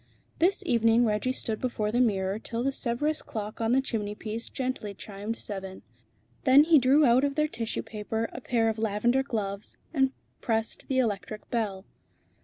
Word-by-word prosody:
This 380 +4 +2
evening 230 -4 +4
Reggie 215 +3 +1
stood 225 -4 -3
before 215 -4 -1
the 240 - +1
mirror 200 -4 +1
till 230 +1 -3
the 275 - +1
Sèvres 275 +4 -1
clock 215 0 -6
on 225 0 +1
the 265 +2 +3
chimneypiece 215 -1 -4
gently 250 -6 -3
chimed 205 +3 -5
seven. 190 -2 -6 0.6
Then 275 +1 +7
he 315 -1 +6
drew 270 +4 +5
out 245 +2 +5
of 280 -1 0
their 305 0 +2
tissue 230 -7 -3
paper 220 +1 -3
a 245 - -7
pair 230 -2 +1
of 220 0 -1
lavender 225 +4 +2
gloves, 205 -6 -3 0.2
and 265 -3 +3 0.3
pressed 225 -2 -1
the 265 - 0
electric 215 -3 -1
bell. 205 -5 -2
230 Hz, 170 wpm, -28 LUFS, 210-260 Hz, 0.6 s, Then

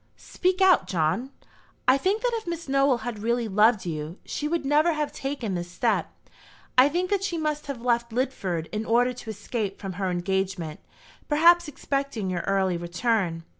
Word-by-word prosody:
"Speak 370 +1 -1
out, 380 -2 +5
John." 180 +9 0 0.6
"I 255 - +7
think 390 - 0
that - - +2
if 450 -4 -3
Miss 340 -2 -4
Nowell 275 -3 +2
had 235 -4 -4
really 235 +1 0
loved 210 +1 +3
you, 160 +1 -4
she 295 - -3
would 325 -2 -1
never 305 +4 +3
have 300 -1 -2
taken 270 -7 -4
this 175 -1 -4
step. 175 - 0 0.6
I 255 +3 +7
think 360 +5 -1
that 395 -1 +1
she 360 -4 -1
must 300 -2 -2
have 260 -4 -5
left 235 -1 +1
Lidford 200 -10 -2
in 215 0 -2
order 240 +3 +2
to 245 -2 -10
escape 205 -1 -4
from 195 -2 -5
her 190 - +1
engagement, 180 -3 -2 0.5
perhaps 340 +3 +5
expecting 275 -8 -3
your 175 -2 -1
early 190 -2 +1
return. 175 -1 -1
240 Hz, 175 wpm, -26 LUFS, 190-295 Hz, 0.6 s, I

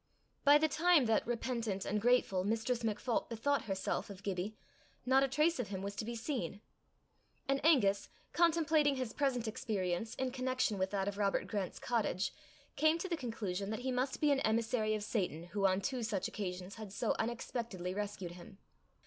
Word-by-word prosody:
By 290 +1 +8
the 315 +1 +3
time 330 -2 +4
that, 225 -1 +2
repentant 235 -4 -2
and 210 0 0
grateful, 235 -6 +3
Mistress 225 +4 0
MacPholp 225 +2 -1
bethought 275 +5 0
herself 195 -1 -2
of 195 -1 -10
Gibbie, 195 +2 -3 0.5
not 265 +1 +5
a 275 - +3
trace 300 +4 +2
of 245 - -1
him 195 -1 -5
was 200 0 -4
to - - -2
be 235 +1 -4
seen; 230 - -3 0.9
and 275 0 +1
Angus, 205 -11 +4 0.2
contemplating 315 -4 +3
his 255 -3 -3
present 255 -5 0
experience 210 -1 -2
in 260 -1 -1
connection 255 -5 0
with 190 0 +1
that 195 -1 -1
of 205 0 -3
Robert 200 -1 +1
Grant's 200 -4 -3
cottage, 215 -6 0 0.4
came 310 +1 +4
to 335 - -3
the 350 - 0
conclusion 205 - -3
that 220 +2 -3
he 260 +1 -1
must 255 +1 -1
be 300 -1 +3
an 275 - +3
emissary 220 -1 +1
of 210 - -3
Satan 185 -7 -1
who 200 -1 +3
on 190 +1 +1
two 255 +4 -2
such 220 -4 -1
occasions 185 -1 -5
had 210 -3 -7
so 220 +2 0
unexpectedly 225 -5 -3
rescued 200 -3 -4
him. 180 +3 -12
225 Hz, 185 wpm, -35 LUFS, 200-260 Hz, 0.9 s, By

